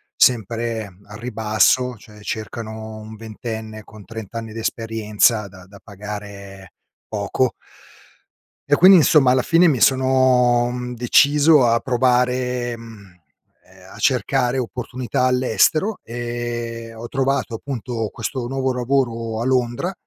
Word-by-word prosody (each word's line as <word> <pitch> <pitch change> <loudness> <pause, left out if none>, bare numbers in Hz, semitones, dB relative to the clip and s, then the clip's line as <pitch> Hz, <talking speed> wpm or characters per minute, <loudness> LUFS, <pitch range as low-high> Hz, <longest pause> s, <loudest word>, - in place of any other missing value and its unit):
sempre 115 -1 +1 0.2
al 105 0 -10
ribasso, 120 +2 +1
cioè 105 0 -16
cercano 110 0 -6
un 110 0 -10
ventenne 110 -1 -7
con 110 -2 -15
30 110 -3 -9
anni 115 -1 -6
di 115 - -6
esperienza 110 -1 0
da 95 -2 -15
da 100 +1 -16
pagare 100 -2 -9 0.3
poco 110 +4 -1 1.1
e 145 - +4
quindi, 185 +2 +8
insomma, 150 -5 +5
alla 130 0 +3
fine 170 +4 +4
mi 130 -7 +1
sono, 130 -2 +3
mhmm, 125 0 -5
deciso 145 +3 +4
a 115 0 +3
provare, 125 -1 0
mhmm, 100 -6 -14 0.5
ehm, - - -18
a - - -12
cercare 130 -1 +1
opportunità 125 0 -3
all'estero 130 - +2
e 120 -1 -5
ho 115 +1 -8
trovato, 135 -3 -1
appunto, 120 -3 -4
questo 120 +2 -5
nuovo 130 0 -1
lavoro 120 -3 -1
a - - -2
Londra, 130 +7 0
120 Hz, 125 wpm, -20 LUFS, 110-130 Hz, 1.1 s, quindi